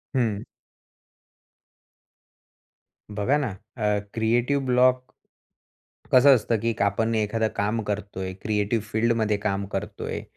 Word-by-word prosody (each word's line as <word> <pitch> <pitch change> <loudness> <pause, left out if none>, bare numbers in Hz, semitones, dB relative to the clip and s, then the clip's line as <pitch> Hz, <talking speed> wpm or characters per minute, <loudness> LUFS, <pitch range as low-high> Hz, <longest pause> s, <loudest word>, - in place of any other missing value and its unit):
हं. 110 -5 0 2.8
बघा 130 +8 +2
ना, 145 -6 -1 0.3
अ, 105 -2 +1
क्रिएटिव 120 +5 +1
ब्लॉक 125 0 +3 1.1
कसं 135 +2 +8
असतं, 115 -1 0
की 115 +1 0
आपण 110 +3 +1
एखादं 110 +1 0
काम 105 +3 0
करतोय. 100 -2 -4
क्रिएटिव्ह 105 +1 0
फील्डमध्ये 110 -1 +1
काम 100 -1 -2
करतोय 100 +1 -4
110 Hz, 100 wpm, -25 LUFS, 105-120 Hz, 2.8 s, कसं